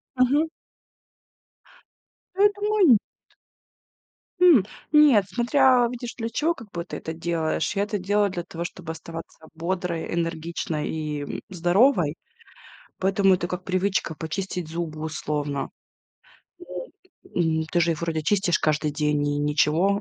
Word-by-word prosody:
Мгм. 275 +5 +3 1.9
А 390 - 0
я 415 - +7
думаю, 415 -3 +2
нет. 225 - +7 1.4
М, 340 - +7 0.3
нет, 295 -9 +6
смотря 250 +1 +4
видишь, 245 -1 -6
для 230 -1 -3
чего 310 +9 +1
как 225 -9 -13
бы 170 0 -4
ты - - -6
это 160 - -6
делаешь. 165 +1 -1
Я 200 - +2
это 210 0 -2
делаю 205 +2 +1
для 180 -2 -4
того, 170 0 -6
чтобы 175 -1 -6
оставаться 165 0 -9
бодрой, 170 0 -3
энергичной 165 -2 -2
и, 150 -2 -3
м, 145 - -5
здоровой, 180 - +3 0.8
поэтому 195 0 +3
это 175 -1 -2
как 180 +1 -5
привычка 185 -2 0
почистить 180 +2 -4
зубы 160 -2 -4
условно. 150 -2 -3 0.9
Вот, 360 +7 -8 0.5
м, 160 -2 +1
ты 175 - +2
же 170 0 +3
их 160 - -4
вроде 160 -2 -2
чистишь 190 0 +2
каждый 150 0 +1
день 150 -1 0
и 145 0 -1
ничего, 150 +7 +2
175 Hz, 140 wpm, -25 LUFS, 160-210 Hz, 1.9 s, я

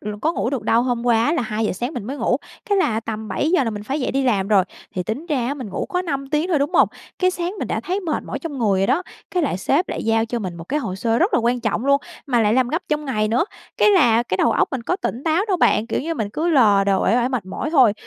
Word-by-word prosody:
l 210 - -6
có 320 - +2
ngủ 240 - -1
được 275 -4 -2
đâu, 230 +1 +3
hôm 245 -1 -1
qua 235 +5 +3
là 330 - 0
2:00 215 -1 -1
sáng 245 - -4
mình 240 - -4
mới 265 +6 -5
ngủ, - - +1 0.3
cái 405 - +4
là 225 -12 +1
tầm 220 -1 -5
7:00 300 - +1
là 225 - -1
mình 210 -1 -6
phải 270 +7 -3
dậy 255 - -1
đi 275 - +1
làm 205 -7 +1
rồi. 200 -4 +4 0.3
Thì 180 - -1
tính 225 - -4
ra 270 -8 0
á, 280 - -1
mình 255 -7 -7
ngủ 190 - -3
có 360 0 -1
5 275 -5 -3
tiếng 305 +3 0
thôi, 335 -5 +2
đúng 290 +6 -1
hông? - - +5 0.3
Cái 370 0 +3
sáng 355 0 -3
mình - - -3
đã - - -1
thấy 375 +3 -2
mệt 335 -5 -2
mỏi - - -4
trong 305 -5 -6
người 200 -5 +2
rồi 195 - +2
đó, 285 - +2 0.3
cái 360 -2 0
lại 270 - -1
sếp 285 - +1
lại - - -4
giao 225 0 +2
cho 235 +1 -3
mình 185 -6 -5
một 165 - -8
cái 295 - -1
hồ 185 - -4
sơ 225 +4 0
rất - - +2
là - - +4
quan 240 +2 +1
trọng 230 +1 -1
luôn, 280 0 +4 0.3
mà 245 -4 +2
lại 210 0 +3
làm 255 -1 +2
gấp 325 +6 -1
trong 300 0 -1
ngày 215 -6 0
nữa. 240 +8 +2 0.3
Cái 420 - +5
là 240 - +4
cái 185 -6 -2
đầu 230 - +3
óc - - +2
mình 260 -3 -3
có 360 +10 -1
tỉnh 255 - -4
táo 325 +4 +2
đâu 375 - +2
bạn, 220 -8 +3
kiểu - - -1
như, 330 +4 -3
mình 220 -8 -2
cứ 320 +9 -1
lờ 215 - +5
đờ, 195 -1 +2
uể - - +3
oải, 245 0 +2
mệt 245 -8 -3
mỏi 245 +10 -4
thôi. 260 -9 +5
250 Hz, 305 wpm, -21 LUFS, 220-300 Hz, 0.3 s, hông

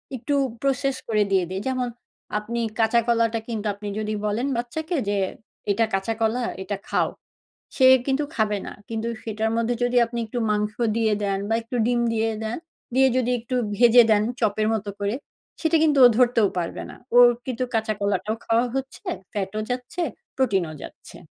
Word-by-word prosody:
একটু 260 +4 -3 0.3
process 275 0 +1
করে 210 -2 +2
দিয়ে 190 -2 +3
দেই। 190 +1 -3
যেমন 255 -1 0 0.5
আপনি 235 +3 -3 0.2
কাঁচা 225 +1 +4
কলাটা 230 -1 +2
কিন্তু 220 -2 -4
আপনি 205 +1 -8
যদি 215 0 -2
বলেন 225 +6 0
বাচ্চাকে 315 +8 -3
যে, 205 - +1 0.5
"এটা 225 +3 +2
কাঁচা 195 +4 0
কলা। 230 +3 +1 0.2
এটা 200 0 -3
খাও।" - - +1 0.7
সে 260 - +5 0.2
কিন্তু 275 +2 +1
খাবে 210 -2 +1
না। - - -6 0.2
কিন্তু 225 0 -3
সেটার 220 0 -2
মধ্যে 230 +1 +1
যদি 245 0 +1
আপনি 235 +1 -6
একটু 240 +3 -4
মাংস 210 0 0 0.2
দিয়ে 220 -2 +2
দেন 195 -1 0
বা 225 - +1
একটু 245 +2 -5
ডিম 240 0 +2
দিয়ে 225 0 +1
দেন, 220 +2 -2 0.4
দিয়ে 265 0 +5
যদি 250 -1 +1
একটু 250 +2 -5 0.2
ভেজে 240 +1 +7
দেন 210 -1 +4 0.2
চপের 215 -1 +1
মতো 210 -2 -3
করে 200 +2 0 0.5
সেটা 325 0 +2
কিন্তু 295 -3 +3
ও - - +9
ধরতেও 240 -5 +4
পারবে 170 -1 -3
না। - - -11 0.2
ওর 245 0 +9 0.2
কিন্তু 255 0 -2
কাঁচা 220 -1 +1
কলাটাও 200 +2 0
খাওয়া 230 +2 +2
হচ্ছে। 270 0 -5 0.3
ফ্যাটও 205 +1 -3
যাচ্ছে, 250 +8 -3 0.3
প্রোটিনও 195 -11 +1
যাচ্ছে। - - -11
225 Hz, 175 wpm, -24 LUFS, 210-250 Hz, 0.7 s, ও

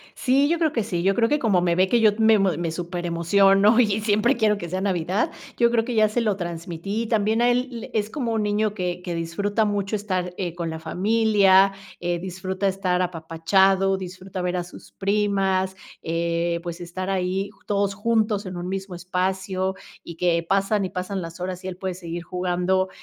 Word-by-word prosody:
Sí, 275 +2 +2
yo 340 - +2
creo 320 -2 +1
que 230 - 0
sí, 175 -3 -2
yo 195 +1 +3
creo 230 -1 +2
que 295 - +2
como 200 -8 +2
me 175 -1 +1
ve, 185 +2 +3
que 240 +5 +3
yo 215 -1 +6
me 220 -1 +5
me 175 -4 0
súperemociono 180 +5 +3
y 215 -3 +2
siempre 215 +4 +2
quiero 215 -2 +2
que 175 -4 -6
sea 185 +2 -2
Navidad, 185 +1 0 0.3
yo 235 - +4
creo 230 -1 +2
que 245 -1 -3
ya 215 -1 +5
se 240 +3 0
lo 215 -3 +1
transmití. 175 +4 -4
También 220 0 +1
a 240 - +4
él, 245 -1 -2
es 210 -1 0
como 240 -3 -2
un 220 -1 0
niño 210 0 0
que 180 -3 -3
que 175 -2 -4
disfruta 200 +6 -1
mucho 205 0 -1
estar, 185 -4 -2
eh, 175 -3 -3
con 170 -1 -3
la 160 0 -5
familia, 195 +2 +3 0.3
eh, 175 0 -1
disfruta 190 +2 -3
estar 185 -2 0
apapachado, 185 +3 +2
disfruta 185 0 -7
ver 180 0 -1
a 175 - -1
sus 175 - -13
primas, 195 -2 0 0.3
eh, 170 +1 -1
pues, 175 0 -6
estar 185 +2 -5
ahí 190 +1 -1
ju 200 - -27
todos 200 -1 0
juntos 215 0 0
en 185 -1 -6
un 175 0 -5
mismo 190 0 -4
espacio 185 +1 -2 0.3
y 170 - -9
que 170 0 +1
pasan 195 +1 +1
y - - -4
pasan 185 +2 -4
las 165 0 -8
horas 180 +1 -4
y - - -5
él 185 -1 -6
puede 185 0 -3
seguir 170 -1 -6
jugando, 180 +1 0
190 Hz, 200 wpm, -24 LUFS, 180-210 Hz, 0.3 s, yo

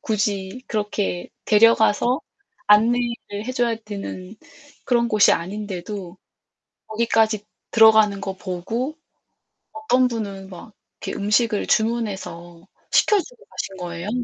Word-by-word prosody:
굳이 205 +2 -2
그렇게 205 -4 -2 0.2
데려가서 230 +4 +4 0.5
안내를 230 -1 +2
해 255 - -4
줘야 240 -2 0
되는 200 -1 -7 0.5
그런 235 -2 +2
곳이 215 -2 +5
아닌데도 190 0 -5 0.7
거기까지 220 -1 +1 0.3
들어가는 220 -3 +5
거 195 -1 -5
보고 225 - -4 0.8
어떤 255 -4 +2
분은 200 -5 -5
막 190 +4 -11 0.3
이렇게 - - -4
음식을 210 +1 +1
주문해서 195 -6 -2 0.2
시켜주고 425 +4 +1
가신 195 -1 -6
거예요. 175 +2 -5
210 Hz, 255 characters per minute, -22 LUFS, 195-235 Hz, 0.8 s, 곳이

